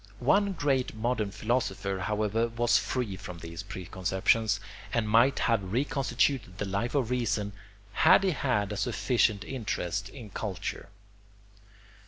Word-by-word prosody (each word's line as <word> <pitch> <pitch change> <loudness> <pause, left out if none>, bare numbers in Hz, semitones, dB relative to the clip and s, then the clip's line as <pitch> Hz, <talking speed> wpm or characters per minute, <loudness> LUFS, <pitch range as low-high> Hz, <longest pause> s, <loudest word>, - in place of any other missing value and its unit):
One 200 0 +3
great 135 -8 0
modern 110 -2 0
philosopher, 100 -3 -1
however, 105 +3 0
was 120 +1 +2
free 120 -7 -2
from 90 -1 -8
these 85 0 -7
preconceptions, 95 +3 0 0.3
and 115 -2 0
might 115 +5 +4
have 100 -6 +1
reconstituted 130 -4 0
the 100 - -2
Life 100 +7 -2
of 125 -4 +1
Reason 105 -4 0 0.4
had 185 - +6
he 190 - +3
had 125 - 0
a 105 - -3
sufficient 105 0 +1
interest 100 -5 -3
in 115 -5 -10
culture. 100 -1 -4
110 Hz, 130 wpm, -29 LUFS, 100-125 Hz, 0.4 s, had